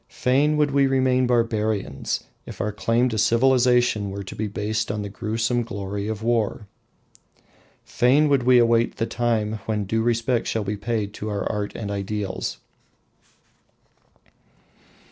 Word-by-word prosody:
Fain 145 +4 +1
would 150 -1 +2
we 140 0 +3
remain 130 -1 +2
barbarians, 110 - -1 0.2
if - - -9
our 105 - -1
claim 115 +4 +1
to 110 -2 -2
civilisation 120 -2 +3
were 100 +1 -5
to 95 - -9
be 110 - -2
based 105 +1 -2
on 105 0 -3
the 100 - -5
gruesome 115 +3 -1
glory 100 -3 -5
of 110 0 -4
war. 115 -2 0 1.2
Fain 135 +5 +3
would 140 -3 +3
we 125 +1 +5
await 115 -1 +3
the 115 - -1
time 110 -3 -1
when 105 -2 -1
due 110 +3 0
respect 115 +1 0
shall 110 - -1
be 100 +1 -3
paid 105 0 -3
to 110 - -5
our 100 -1 -2
art 105 -1 -3
and 105 -3 -5
ideals. 100 0 -3
115 Hz, 145 wpm, -23 LUFS, 105-125 Hz, 1.2 s, we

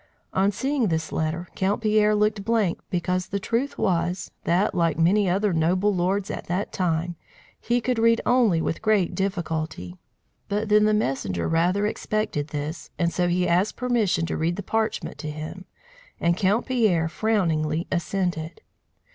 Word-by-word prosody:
On 195 +2 +3
seeing 265 +2 0
this 160 -2 -1
letter, 160 +3 -2
Count 195 +2 0
Pierre 215 -1 +3
looked 210 -1 +1
blank 220 -5 +1
because 180 0 -1
the 200 - -2
truth 235 +8 -2
was, 175 -1 0
that, 180 +5 +2
like 165 -3 +1
many 185 +4 +3
other 195 +2 +1
noble 180 +5 +2
lords 190 +3 0
at - - -6
that 180 +4 -2
time, 170 -1 -1 0.4
he 240 +1 +1
could 245 0 -1
read 230 0 +4
only 225 -10 +3
with 160 - -2
great 215 -5 +2
difficulty. 160 - -3 0.5
But 210 +2 -1
then 210 0 +5
the 215 - +3
messenger 100 - -1
rather 180 +5 +2
expected 215 -8 -2
this, 150 +2 -5
and 170 -1 0
so 175 -1 +1
he 180 +1 +1
asked 180 +5 +2
permission 225 -9 +1
to 160 - -3
read 165 +2 0
the 205 - -5
parchment 220 -1 -2
to 150 - -4
him, 155 +5 -7 0.5
and 170 0 +2
Count 200 +5 +1
Pierre 215 -11 +2
frowningly 165 -5 0
assented. 175 -3 -2
185 Hz, 160 wpm, -24 LUFS, 165-210 Hz, 0.5 s, then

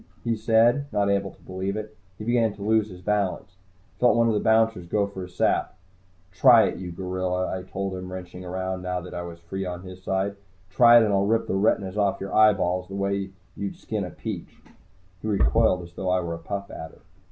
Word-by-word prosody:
he 115 -1 0
said, 115 +5 +3
not 100 -1 +1
able 100 0 0
to - - -19
believe 95 +2 -3
it. 110 0 -6 0.2
He 105 - -7
began 115 -2 +2
to 100 - -8
lose 110 0 +2
his 90 -2 -11
balance. 100 -2 -1 0.5
I - - -33
felt 125 -1 +5
one 115 0 +4
of 115 - +2
the 105 - +1
bouncers 110 -5 +2
go 100 +3 +1
for 100 -1 -7
his 90 -1 -9
sap. - - +1 0.5
"Try 115 +3 +7
it, - - -1
you 90 -2 -6
gorilla," 90 +1 -2
I 95 - -4
told 95 +1 -4
him, 90 0 -6
wrenching 90 0 -8
around, 95 +1 -3
now 90 0 -2
that 90 - -10
I 85 - -4
was 85 -1 -8
free 95 +3 -5
on 90 -1 -5
his 95 0 -10
side. 95 +2 -1 0.3
"Try 120 +3 +7
it - - +4
and 105 - 0
I'll 100 0 +2
rip 115 +1 +2
the - - -3
retinas 95 0 +1
off 100 -1 +1
your 95 - -6
eyeballs 90 -4 +3
the 95 - -8
way 100 0 -1 0.3
you'd 100 -1 -4
skin - - -4
a - - -5
peach!" - - -6 0.7
He - - -5
recoiled 90 - +2
as 85 0 -12
though 90 - -3
I 90 0 +3
were 85 -1 -4
a 85 - -6
Puff 100 +4 -5
Adder. 80 0 -9
95 Hz, 225 wpm, -25 LUFS, 90-105 Hz, 0.7 s, Try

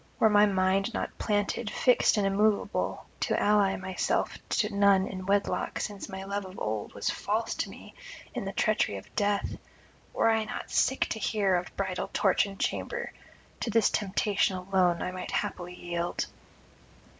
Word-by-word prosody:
Were 220 - +4
my 210 0 +6
mind 195 +2 +1
not - - -3
planted, 205 +1 0
fixed 250 -1 +3
and 205 - +2
immoveable, 205 +2 +1
to - - +1
ally 205 -2 +3
myself 190 0 -1
to 210 -1 0
none 200 -1 +5
in 185 -1 -6
wedlock 200 0 0
since 205 -2 -5
my 190 0 -6
love 200 +1 -3
of 185 0 -10
old 105 -1 -3
was - - 0
false - - -1
to - - -3
me - - -12 0.4
in - - -3
the - - -3
treachery 100 - +1
of 95 - -12
death; 205 -1 0 0.5
were 225 - +3
I 220 -1 +1
not - - -6
sick 265 - +2
to 220 - -3
the 215 - -1
heart 190 -3 +3
of - - -18
bridal 190 -2 -2
torch 195 0 +3
and 195 -1 -10
chamber, 480 -1 -2 0.5
to - - -2
this 225 0 +3
temptation 200 -1 +1
alone 180 -2 +1
I 180 - -2
might 185 0 -6
haply 180 0 -3
yield. 175 -1 -2
195 Hz, 170 wpm, -29 LUFS, 185-210 Hz, 0.5 s, my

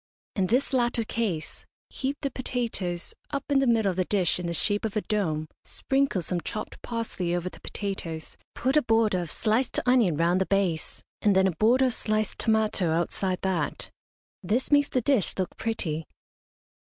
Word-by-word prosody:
In 190 -2 +1
this 255 +6 +1
latter 240 -2 +2
case, 210 -8 -3 0.2
heap 275 +1 -2
the 275 -2 -1
potatoes 230 -9 -2 0.2
up 280 -1 -2
in 275 - +5
the 270 - +2
middle 225 -4 +3
of 180 - -7
the 185 - +2
dish 180 -4 +1
in 175 - -3
the 170 - -2
shape 205 +5 +1
of 220 -2 -2
a 215 - +1
dome 160 -9 -1 0.2
sprinkle 270 -9 0
some 175 +2 -1
chopped 215 - -5
parsley 215 -7 -2
over 175 +1 -2
the - - -15
potatoes, 175 -6 -4 0.2
put 265 +3 0
a 300 - +6
border 225 -5 +2
of 170 - -5
sliced 225 +4 +1
onion 240 - +4
round 175 +3 +2
the 190 - +1
base, 190 -5 0 0.2
and 205 -2 +4
then 190 0 +5
a 190 - +3
border 230 +10 +3
of 255 - +1
sliced 215 -1 -1
tomato 220 -5 +2
outside 180 +3 -1
that. 180 -6 -2 0.5
This 230 +10 0
makes 285 -1 +5
the 255 - +1
dish 250 -5 +1
look 185 -2 -2
pretty. 165 -9 -2
210 Hz, 180 wpm, -27 LUFS, 180-240 Hz, 0.5 s, a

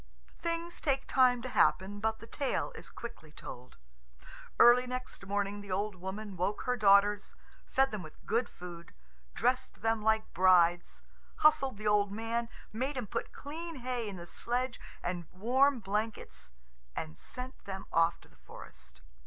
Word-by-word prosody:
Things 335 +1 -3
take 270 -2 +1
time 250 -2 +4
to 255 - -4
happen, 205 -4 +2
but 220 +1 0
the 230 - -11
tale 270 +4 -1
is - - -9
quickly 160 -10 -9
told. 125 -4 -10 0.8
Early 250 +1 +8
next 250 -5 -6
morning 205 0 -1
the 200 -1 -9
old 205 +3 0
woman 190 +3 -6
woke 185 +4 -1
her 250 - +1
daughters, 205 -1 +4 0.3
fed 270 0 +3
them 215 -3 -4
with 155 -3 -13
good 235 +2 +1
food, 175 -2 -10 0.4
dressed 255 -1 0
them 225 -1 +2
like 220 0 +1
brides, 175 -2 +4 0.4
hustled 270 -6 +5
the 215 - -8
old 205 -1 +3
man, 230 +2 -2 0.2
made 260 +5 -2
him 250 - -2
put - - -4
clean 330 +3 -7
hay 245 -4 -3
in 200 - -6
the 170 -1 -8
sledge 245 +8 -2 0.2
and 175 -2 -3
warm 255 +8 +3
blankets, 210 - -3 0.4
and 155 0 -4
sent 255 +1 -8
them 190 -1 -5
off 165 +1 +3
to - - -18
the - - -24
forest. 65 0 -13
215 Hz, 160 wpm, -32 LUFS, 190-250 Hz, 0.8 s, Early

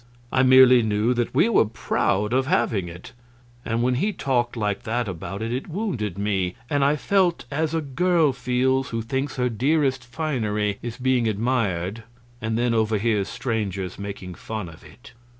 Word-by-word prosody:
I 130 - +4
merely 130 -1 +7
knew 110 +2 +1
that 120 -1 -1
we 200 - +5
were 230 - +4
proud 105 -1 0
of 130 +1 +1
having 110 - +1
it, 85 +1 -10 0.5
and 115 +1 -1
when 125 +1 +2
he 195 +12 0
talked 120 - -1
like 105 0 -1
that 120 0 -2
about 95 +3 -5
it, 115 +1 -2
it 130 - -3
wounded 155 - -3
me, 95 -3 -1 0.2
and 145 -1 +2
I 140 +2 +3
felt 180 +2 +1
as 155 +2 -1
a 165 - +1
girl 160 +1 +2
feels 130 +1 0
who 115 -1 -3
thinks 135 +4 -2
her 125 -1 +1
dearest 135 +2 +1
finery 115 -7 -2
is 120 -1 -6
being 130 -2 +1
admired 110 -3 -1 0.4
and 110 0 -1
then 120 0 +1
overhears 110 -2 +1
strangers 105 -7 -3
making 100 -2 -6
fun 105 0 -6
of 80 - -15
it. 125 - -16
120 Hz, 170 wpm, -24 LUFS, 105-130 Hz, 0.5 s, merely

